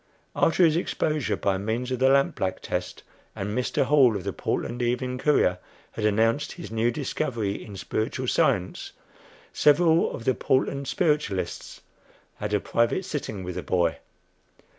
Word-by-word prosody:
After 170 +2 +4
his 160 -1 +3
exposure 155 -4 -1
by 95 -1 0
means 115 +5 -2
of 130 - -1
the 130 0 +4
lamp 140 0 +3
black 95 -1 -2
test, - - -4 0.3
and 105 +2 -4
Mr. 125 - 0
Hall, 135 -6 +5
of 100 - -4
the - - -3
"Portland 120 +1 -3
Evening 125 +1 -1
Courier," 110 -11 +2 0.3
had 110 - -3
announced 115 +6 +1
his 175 - -9
new 115 +1 +1
discovery 115 -6 -2
in 105 - -10
spiritual 110 +7 -3
science, 100 -8 0 0.6
several 160 +3 +4
of 115 - -7
the 130 - +3
Portland 135 +2 0
spiritualists 145 - -1 0.6
had 105 0 -4
a 105 - +2
private 115 - 0
"sitting" 110 - -4
with 90 0 -5
the 90 - -4
boy. 85 -5 0
120 Hz, 155 wpm, -26 LUFS, 100-140 Hz, 0.6 s, Hall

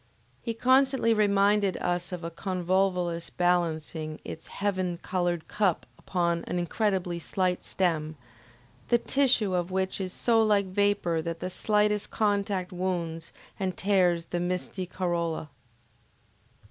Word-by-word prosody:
He 230 - -3
constantly 260 -1 +4
reminded 205 -2 +3
us 175 +1 -2
of 180 -2 -5
a 165 - -4
convolvulus 180 -1 0
balancing 160 -3 -1
its 160 - -7
heaven 185 -3 -1
colored 175 -3 -1
cup 195 -5 +1
upon 170 -2 0
an 180 - -2
incredibly 180 -1 0
slight 180 +1 -1
stem, 160 -4 -1 0.7
the 240 - +4
tissue 240 -6 +2
of 175 0 0
which 190 +1 -1
is 185 -1 -3
so 230 +3 +3
like 210 -2 +3
vapor 190 -3 +1
that 165 0 -4
the 185 - -4
slightest 210 +2 +1
contact 200 -3 0
wounds 175 -3 -3 0.3
and 190 -2 -2
tears 180 -4 +2
the 175 - -3
misty 180 +1 -3
corolla. 170 -4 -2
185 Hz, 125 wpm, -28 LUFS, 175-200 Hz, 0.7 s, constantly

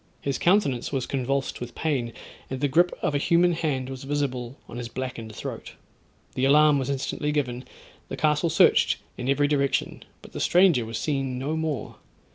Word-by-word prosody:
His 140 -1 -2
countenance 175 - +2
was 135 -3 -1
convulsed 135 0 -2
with 120 -1 -7
pain, 135 -7 -1 0.4
and 130 - -4
the 145 - +1
grip 175 +6 +3
of - - +1
a 145 - +1
human 170 +4 +3
hand 145 -6 -1
was 130 0 -7
visible 135 -3 -2
on - - -8
his 120 -1 -5
blackened 115 -3 -6
throat. - - -7 0.6
The 130 - -2
alarm 150 +1 +5
was 130 0 -3
instantly 140 +2 -2
given, 125 -4 -2 0.4
the - - -6
castle 150 +2 +2
searched - - +4 0.2
in 125 - -4
every 145 +1 +3
direction, 140 -2 0 0.2
but - - -13
the - - -6
stranger 175 -10 +4
was 115 - -4
seen 135 -4 -2
no 140 +5 -2
more. 155 -7 -3
140 Hz, 180 wpm, -25 LUFS, 130-150 Hz, 0.6 s, alarm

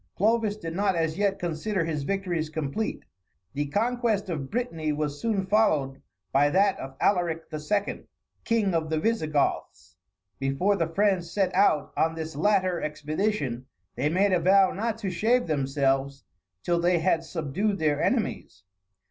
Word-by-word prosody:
Clovis 215 0 +2
did 165 -5 -6
not 195 -1 +1
as 165 -1 0
yet 200 -1 +1
consider 175 +2 -2
his 155 -3 -2
victories 175 -1 -2
complete; 155 +7 -3 0.5
the 145 +1 -2
conquest 220 - 0
of 140 -5 -4
Brittany 165 -11 -2
was 145 -1 -3
soon 210 -4 0
followed 155 -10 +1 0.3
by 145 +2 +4
that 195 +4 +2
of 135 0 -8
Alaric 175 -4 +1
II., 200 +7 -2 0.4
King 220 -5 +1
of 160 -1 0
the 160 -1 0
Visigoths. 155 -8 -1 0.4
Before 135 +10 +1
the 165 -4 0
French 190 +1 +1
set 190 +3 -1
out 180 -6 +2
on 160 0 +1
this 160 -2 -6
latter 185 +1 +2
expedition, 150 - -2 0.3
they 140 +5 0
made 190 +4 +2
a 180 - +3
vow 190 +2 +5
not 225 +2 -2
to 200 -4 -3
shave 230 +8 +2
themselves 135 -2 0 0.4
till 170 -1 +1
they 175 +1 +3
had 165 -1 +1
subdued 180 +6 -2
their 150 -3 +1
enemies. - - -1
170 Hz, 150 wpm, -26 LUFS, 150-200 Hz, 0.5 s, vow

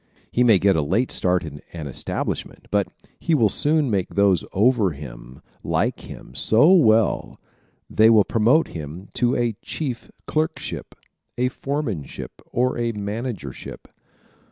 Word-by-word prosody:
He 125 - +3
may 115 -5 +6
get 95 +1 +3
a 80 - +2
late 95 - 0
start 90 0 +1
in 75 -3 -8
an 80 -3 -6
establishment 70 - -3
but - - +2 0.3
he 165 - +1
will 115 -7 +4
soon 150 +2 +1
make 95 -3 -1
those 100 -6 +3
over 105 -3 +3
him 65 -2 -11 0.2
like - - 0
him - - -11
so 110 - +4
well 115 - +3 0.5
they 110 +1 +5
will 110 -2 +6
promote 120 +10 +3
him 80 +4 -8
to 125 +1 +1
a 120 -2 0
chief 130 -7 -5 0.2
clerkship, 160 +1 -3 0.4
a 125 +1 +1
foremanship 130 - -4 0.2
or 125 +1 0
a 115 -1 0
managership. 105 - -6
110 Hz, 140 wpm, -23 LUFS, 90-125 Hz, 0.5 s, may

